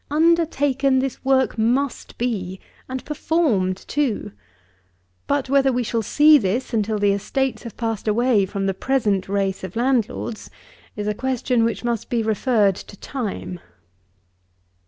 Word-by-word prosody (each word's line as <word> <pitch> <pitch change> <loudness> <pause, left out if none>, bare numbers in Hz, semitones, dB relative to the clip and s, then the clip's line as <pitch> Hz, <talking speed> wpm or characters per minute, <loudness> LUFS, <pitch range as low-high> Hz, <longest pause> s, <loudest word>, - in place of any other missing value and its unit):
Undertaken 290 -4 +2
this 265 0 -2
work 265 -3 +2
must 250 +5 0
be, 195 -6 -2 0.3
and 260 0 -5
performed 275 - +1
too; 280 -7 -1 1.0
but 285 -2 0
whether 270 0 +3
we 250 0 0
shall 230 0 -1
see 295 +7 +6
this 230 +6 -2
until 215 -1 0
the 205 -1 +3
estates 255 +7 -1
have 235 - -9
passed 225 -2 -3
away 225 0 +3
from 195 0 -3
the 195 - +1
present 205 -5 0
race 195 -1 -1
of 190 +1 -7
landlords, 235 -2 -1 0.5
is 210 -1 -4
a 210 - +1
question 250 0 0
which 230 +1 -1
must 235 -2 -2
be 235 -2 0
referred 215 -2 +2
to 200 - -11
time. 205 -9 -5
235 Hz, 140 wpm, -22 LUFS, 205-270 Hz, 1.0 s, see